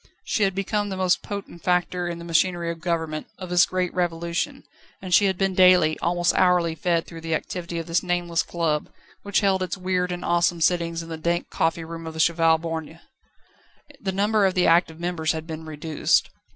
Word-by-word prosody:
She -, -, -1 dB
had 195 Hz, -2 st, +2 dB
become 205 Hz, +1 st, -1 dB
the 190 Hz, -, -4 dB
most 185 Hz, -1 st, +2 dB
potent 200 Hz, -4 st, -7 dB
factor 180 Hz, 0 st, 0 dB
in 170 Hz, -1 st, -4 dB
the 170 Hz, -, -9 dB
machinery 170 Hz, 0 st, +1 dB
of 165 Hz, -, -8 dB
government, 160 Hz, -3 st, -2 dB
of 185 Hz, -2 st, -8 dB
this 175 Hz, -1 st, +5 dB
great 185 Hz, -1 st, -2 dB
Revolution, 170 Hz, -1 st, -2 dB, 0.4 s
and 185 Hz, -2 st, -5 dB
she 205 Hz, -, +6 dB
had 190 Hz, -2 st, +1 dB
been 195 Hz, 0 st, +1 dB
daily, 180 Hz, -4 st, +5 dB
almost 175 Hz, 0 st, +1 dB
hourly 180 Hz, -3 st, +3 dB
fed 170 Hz, 0 st, 0 dB
through 165 Hz, -1 st, -10 dB
the 165 Hz, -1 st, -1 dB
activity 170 Hz, +1 st, -5 dB
of 165 Hz, -, -3 dB
this 165 Hz, +1 st, +1 dB
nameless 175 Hz, -2 st, 0 dB
club, 160 Hz, -3 st, -2 dB, 0.3 s
which 200 Hz, +1 st, 0 dB
held 195 Hz, -2 st, +2 dB
its 185 Hz, 0 st, -3 dB
weird 180 Hz, -1 st, -1 dB
and 175 Hz, 0 st, -5 dB
awesome 175 Hz, 0 st, +2 dB
sittings 170 Hz, 0 st, +1 dB
in 165 Hz, -, -11 dB
the 160 Hz, -, -5 dB
dank 170 Hz, +2 st, -2 dB
coffee 165 Hz, 0 st, 0 dB
room 165 Hz, 0 st, -8 dB
of 160 Hz, -, -7 dB
the -, -, -6 dB
Cheval 165 Hz, 0 st, +4 dB
Borgne. 165 Hz, 0 st, -6 dB, 1.0 s
The 190 Hz, -, -2 dB
number 205 Hz, +1 st, +2 dB
of 190 Hz, -, -2 dB
the 180 Hz, -, +3 dB
active 165 Hz, -1 st, +3 dB
members 170 Hz, -2 st, -1 dB
had 160 Hz, 0 st, -5 dB
been 160 Hz, -1 st, -7 dB
reduced. 155 Hz, 0 st, 0 dB
175 Hz, 205 wpm, -24 LUFS, 165-185 Hz, 1.0 s, she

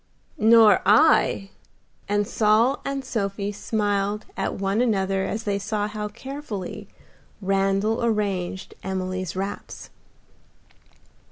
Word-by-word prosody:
"Nor 220 Hz, -2 st, +6 dB
I;" 210 Hz, -3 st, +4 dB, 0.6 s
and 205 Hz, 0 st, +1 dB
Saul 225 Hz, +5 st, +2 dB
and 275 Hz, -1 st, -3 dB
Sophie 200 Hz, -2 st, -2 dB
smiled 205 Hz, 0 st, -1 dB
at -, -, -2 dB
one 195 Hz, +3 st, 0 dB
another 195 Hz, -5 st, +1 dB
as 220 Hz, +3 st, -3 dB
they 200 Hz, -2 st, -1 dB
saw 205 Hz, +1 st, -2 dB
how 210 Hz, 0 st, -4 dB
carefully 235 Hz, -4 st, -7 dB, 0.5 s
Randal 195 Hz, +3 st, +1 dB
arranged 200 Hz, -5 st, -1 dB
Emily's 185 Hz, -1 st, -3 dB
wraps. 195 Hz, +2 st, -6 dB
205 Hz, 100 wpm, -24 LUFS, 195-220 Hz, 0.6 s, Nor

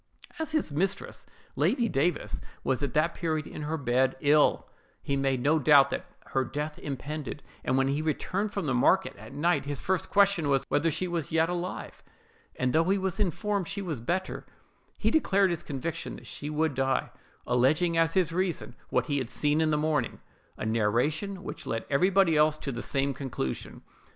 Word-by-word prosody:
As 320 Hz, 0 st, -2 dB
his 310 Hz, -, 0 dB
mistress, 195 Hz, +6 st, -2 dB, 0.3 s
Lady 240 Hz, -3 st, +2 dB
Davis, 160 Hz, -2 st, 0 dB, 0.2 s
was 130 Hz, 0 st, 0 dB
at 140 Hz, -4 st, -2 dB
that 155 Hz, +3 st, +2 dB
period 155 Hz, -3 st, -2 dB
in -, -, -8 dB
her 155 Hz, +2 st, -2 dB
bed, 130 Hz, -1 st, +1 dB
ill, 145 Hz, +1 st, +3 dB, 0.4 s
he 140 Hz, -, -1 dB
made 135 Hz, -2 st, 0 dB
no 155 Hz, +2 st, +3 dB
doubt 145 Hz, -1 st, +6 dB
that -, -, -3 dB, 0.2 s
her 135 Hz, -, +1 dB
death 150 Hz, +4 st, -4 dB
impended; 145 Hz, +1 st, -5 dB, 0.2 s
and 130 Hz, -, +1 dB
when 135 Hz, 0 st, +3 dB
he 140 Hz, +2 st, 0 dB
returned 185 Hz, +7 st, -1 dB
from 200 Hz, -4 st, -3 dB
the 135 Hz, -, 0 dB
market 185 Hz, +10 st, +3 dB
at -, -, -11 dB
night, 170 Hz, +1 st, +1 dB
his 145 Hz, -2 st, -3 dB
first 190 Hz, -2 st, -1 dB
question 200 Hz, -6 st, +3 dB
was, 135 Hz, -2 st, +2 dB
whether 155 Hz, +3 st, +2 dB
she 180 Hz, +4 st, -1 dB
was 170 Hz, -4 st, -3 dB
yet 160 Hz, +1 st, +3 dB
alive: 180 Hz, +1 st, -4 dB, 0.5 s
and 130 Hz, -1 st, 0 dB
though 165 Hz, +1 st, +4 dB
he 195 Hz, +3 st, +2 dB
was 190 Hz, 0 st, -2 dB
informed 200 Hz, 0 st, 0 dB
she 200 Hz, 0 st, -4 dB
was 160 Hz, -9 st, -3 dB
better, 185 Hz, +10 st, -2 dB, 0.5 s
he -, -, +1 dB
declared 200 Hz, -, +3 dB
his 170 Hz, -, -2 dB
conviction 145 Hz, +4 st, -4 dB
that -, -, -12 dB
she 145 Hz, -, -6 dB
would 155 Hz, 0 st, 0 dB
die, 135 Hz, 0 st, 0 dB, 0.3 s
alleging 155 Hz, +8 st, +2 dB
as 165 Hz, 0 st, +2 dB
his 175 Hz, -4 st, +2 dB
reason 185 Hz, -1 st, -1 dB, 0.2 s
what -, -, +1 dB
he 145 Hz, -3 st, 0 dB
had 125 Hz, -3 st, -4 dB
seen 150 Hz, +1 st, +2 dB
in 160 Hz, -, +2 dB
the 150 Hz, -, +2 dB
morning—a 150 Hz, -8 st, -3 dB
narration 125 Hz, -, 0 dB
which -, -, -7 dB
led 115 Hz, 0 st, -2 dB
everybody 185 Hz, +3 st, +4 dB
else 150 Hz, 0 st, +4 dB
to 140 Hz, -, -4 dB
the 120 Hz, -1 st, -4 dB
same 140 Hz, 0 st, 0 dB
conclusion. 125 Hz, -, -5 dB
155 Hz, 185 wpm, -28 LUFS, 140-180 Hz, 0.5 s, doubt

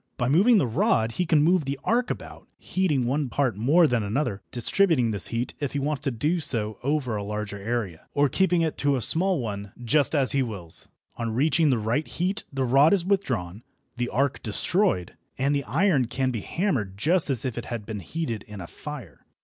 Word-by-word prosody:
By 125 Hz, -1 st, 0 dB
moving 205 Hz, -, +5 dB
the 165 Hz, -, +3 dB
rod 115 Hz, -, +1 dB
he 180 Hz, +8 st, -2 dB
can 155 Hz, -3 st, +4 dB
move 175 Hz, -1 st, +3 dB
the 140 Hz, +1 st, -3 dB
arc 245 Hz, +2 st, +1 dB
about, -, -, -7 dB
heating 155 Hz, -9 st, 0 dB
one 135 Hz, +2 st, -1 dB
part 130 Hz, -5 st, 0 dB
more 145 Hz, -, +4 dB
than 120 Hz, -6 st, +1 dB
another, 105 Hz, -1 st, -2 dB
distributing 125 Hz, -, +2 dB
his 100 Hz, -, +2 dB
heat 115 Hz, +1 st, -3 dB
if 145 Hz, -3 st, -3 dB
he -, -, -1 dB
wants 145 Hz, +1 st, -1 dB
to 140 Hz, -, -1 dB
do 150 Hz, +8 st, -1 dB
so 110 Hz, -8 st, 0 dB
over 135 Hz, -4 st, -1 dB
a 105 Hz, -, -3 dB
larger 105 Hz, 0 st, -4 dB
area, 100 Hz, -6 st, -4 dB
or 145 Hz, 0 st, +4 dB
keeping 175 Hz, +4 st, +2 dB
it 160 Hz, -, -2 dB
to 145 Hz, -1 st, +2 dB
a -, -, -1 dB
small 180 Hz, -, +4 dB
one, 100 Hz, -4 st, -5 dB
just 145 Hz, +5 st, +2 dB
as 135 Hz, -3 st, +4 dB
he 140 Hz, -, +2 dB
wills. 100 Hz, -10 st, -4 dB, 0.3 s
On 115 Hz, -1 st, -3 dB
reaching 155 Hz, +4 st, +3 dB
the 130 Hz, -, +2 dB
right 115 Hz, +8 st, -1 dB
heat 190 Hz, +5 st, -2 dB
the 135 Hz, -1 st, -1 dB
rod 135 Hz, +7 st, +5 dB
is 175 Hz, -3 st, -2 dB
withdrawn, 115 Hz, -, -1 dB, 0.3 s
the 120 Hz, -1 st, -2 dB
arc 135 Hz, +3 st, 0 dB
destroyed, 110 Hz, -, 0 dB, 0.2 s
and 140 Hz, +2 st, +1 dB
the 140 Hz, -1 st, -1 dB
iron 155 Hz, -4 st, +2 dB
can 130 Hz, +2 st, -1 dB
be 115 Hz, -4 st, -4 dB
hammered 125 Hz, -, -2 dB
just 165 Hz, -, +3 dB
as 130 Hz, -3 st, +1 dB
if 125 Hz, -4 st, -3 dB
it 120 Hz, -, -5 dB
had 115 Hz, -3 st, -5 dB
been 110 Hz, -1 st, -5 dB
heated 115 Hz, -, -4 dB
in 105 Hz, -1 st, -9 dB
a 90 Hz, -, -6 dB
fire. 150 Hz, -, -9 dB
135 Hz, 210 wpm, -25 LUFS, 110-155 Hz, 0.3 s, moving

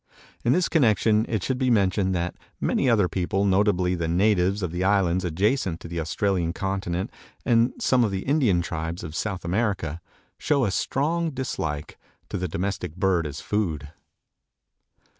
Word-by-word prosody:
In 120 Hz, -, +3 dB
this 180 Hz, +1 st, +2 dB
connection 110 Hz, -, +3 dB
it 110 Hz, -5 st, -1 dB
should 130 Hz, -1 st, -1 dB
be 130 Hz, -1 st, +2 dB
mentioned 95 Hz, -3 st, +2 dB
that 85 Hz, 0 st, -1 dB, 0.3 s
many 135 Hz, -, +1 dB
other 105 Hz, -6 st, +4 dB
people, 95 Hz, +2 st, -1 dB
notably 95 Hz, -2 st, +2 dB
the 85 Hz, -2 st, -2 dB
natives 95 Hz, +2 st, +2 dB
of 90 Hz, -, -2 dB
the 90 Hz, +2 st, -2 dB
islands 95 Hz, -2 st, +2 dB
adjacent 95 Hz, -, 0 dB
to -, -, -9 dB
the 85 Hz, 0 st, -4 dB
Australian 85 Hz, +2 st, 0 dB
continent 95 Hz, -2 st, -2 dB, 0.3 s
and 115 Hz, +1 st, +4 dB
some 125 Hz, -2 st, +3 dB
of 110 Hz, -, +2 dB
the 95 Hz, -1 st, -3 dB
Indian 125 Hz, -, +2 dB
tribes 80 Hz, 0 st, -4 dB
of 80 Hz, -2 st, -7 dB
South 95 Hz, -3 st, -3 dB
America, 90 Hz, -4 st, -1 dB, 0.4 s
show 140 Hz, -4 st, +2 dB
a 100 Hz, -, 0 dB
strong 160 Hz, -, 0 dB
dislike 80 Hz, -, -4 dB, 0.3 s
to -, -, -3 dB
this 90 Hz, -1 st, -2 dB
domestic 95 Hz, -1 st, -3 dB
bird 90 Hz, -3 st, +1 dB
as 70 Hz, -, -7 dB
a -, -, -15 dB
food. 80 Hz, -9 st, -2 dB
95 Hz, 165 wpm, -25 LUFS, 85-110 Hz, 0.4 s, other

